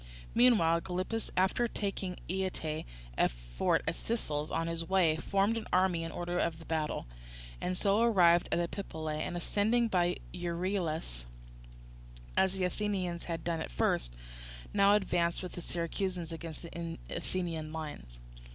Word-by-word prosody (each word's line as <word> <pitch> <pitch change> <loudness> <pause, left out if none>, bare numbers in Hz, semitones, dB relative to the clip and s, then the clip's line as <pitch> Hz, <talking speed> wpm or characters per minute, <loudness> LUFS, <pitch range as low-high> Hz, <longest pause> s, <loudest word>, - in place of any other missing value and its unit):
Meanwhile 210 -9 +5
Gylippus, 185 +6 -2
after 190 +6 +3
taking 195 -4 -3
Ietae, 180 -4 -2 0.3
a - - +5
fort - - 0
of - - -3
the 230 - +2
Sicels, 150 -8 -2
on 165 - 0
his 165 0 -2
way, 175 -3 +3
formed 200 +6 +2
his 225 - -4
army 180 -2 +3
in 165 - -4
order 175 +1 -2
of 165 0 -1
battle, 155 -2 -1 0.6
and 180 0 -1
so 200 +3 +3
arrived 175 -7 +5
at - - +3
Epipolae, 160 -3 -3
and 175 - -2
ascending 220 +6 +2
by 175 -3 +2 0.2
Euryelus, 170 - -2 1.1
as 190 -1 +4
the 190 - 0
Athenians 180 -2 -1
had 165 -1 -3
done 170 -1 -1
at - - -4
first, - - 0 0.6
now 200 0 +6
advanced 175 -4 +1
with 180 - -5
the 175 - -7
Syracusans 175 0 -2
against 165 -1 -6
the 170 0 -5
Athenian 165 -4 -3
lines. 145 - -6
175 Hz, 145 wpm, -32 LUFS, 165-190 Hz, 1.1 s, now